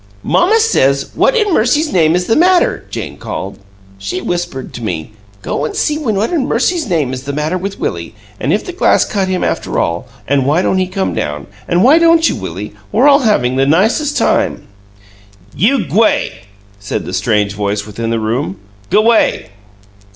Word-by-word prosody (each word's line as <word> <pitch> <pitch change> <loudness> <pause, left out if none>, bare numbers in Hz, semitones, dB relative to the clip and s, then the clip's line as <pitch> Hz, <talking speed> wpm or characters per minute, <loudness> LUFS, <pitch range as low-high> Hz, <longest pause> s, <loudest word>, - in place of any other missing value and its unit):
"Mamma 425 +6 +3
says, 140 - +1
'What - - +2
in 420 -4 +1
mercy's 295 +6 +1
name 160 -2 +3
is 180 0 0
the 225 - +1
matter?'" 360 +2 +3
Jane - - -6
called. 95 - -6 0.4
"She 100 - -4
whispered 175 -8 -4
to 120 - -7
me, 90 -2 -4 0.3
'Go 140 - -2
an' 155 - -3
see 300 0 0
what 220 - -1
in 305 -6 0
mercy's 320 +5 0
name 155 -9 0
is 130 - -5
the 140 +1 -5
matter 150 +4 -1
with 195 +2 -5
Willie; 85 +5 -4 0.2
an' 135 - -1
if 205 - 0
the - - -5
glass 360 - +3
cut 195 -2 -1
him, 185 -1 -1
after - - -2
all; 85 +8 -1 0.2
an' 140 0 +2
why 155 +6 +2
don't 190 - +1
he 185 - 0
come 190 +1 -2
down'; 75 -1 -3 0.2
an' 175 +2 +2
why 290 +6 +6
don't 330 -1 +4
you, - - -1
Willie? 100 +6 -6 0.2
We're 255 +6 +4
all 280 -1 +6
havin' 130 - +1
the 135 0 +2
nicest 220 - +2
time!" - - +1 0.9
"You 245 +4 +2
g'way!" 100 - 0 0.3
said 100 - -4
the - - -6
strange 105 -2 0
voice 105 0 -2
within 115 +2 -5
the 115 0 0
room. 110 -2 -2 0.3
"G'way!" 215 - +2
180 Hz, 185 wpm, -15 LUFS, -, 0.9 s, why